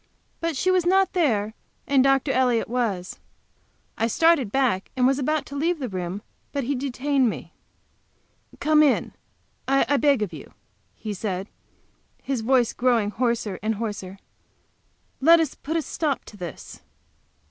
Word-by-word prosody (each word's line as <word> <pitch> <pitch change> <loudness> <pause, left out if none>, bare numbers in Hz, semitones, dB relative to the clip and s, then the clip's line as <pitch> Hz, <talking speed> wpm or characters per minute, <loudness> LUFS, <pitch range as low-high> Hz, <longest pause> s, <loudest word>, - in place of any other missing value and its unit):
But 330 -3 -2
she 370 - +2
was 370 -1 +3
not 380 +2 +3
there, 220 - +1 0.3
and 275 -2 +3
Dr. 270 0 +3
Elliott 250 -3 +2
was. 220 -7 -2 0.8
I 225 - +2
started 300 -3 +3
back, 250 -8 +1
and 250 - +3
was 270 +2 +3
about 305 +2 0
to 280 - -9
leave 330 +5 0
the 260 -5 -4
room, 185 +2 -4 0.3
but 280 -2 -2
he 270 +4 -1
detained 270 0 0
me. - - -7 1.1
"Come 305 0 +4
in, 290 -4 +2 0.5
I 275 +1 +3
beg 280 -6 +3
of 195 - -5
you," - - -10 0.4
he 215 -2 -5
said, 195 -1 -4 0.7
his 270 -4 -2
voice 245 0 +2
grow 250 0 +2
mg 210 -3 0
hoarser 230 -4 -1
and 220 +2 -1
hoarser. 200 -3 -5 1.0
"Let 335 +4 +7
us 320 -4 0
put 320 +3 -3
a 320 - -1
stop 295 -3 -2
to - - -12
this." 175 -4 -8
255 Hz, 155 wpm, -24 LUFS, 215-285 Hz, 1.1 s, Let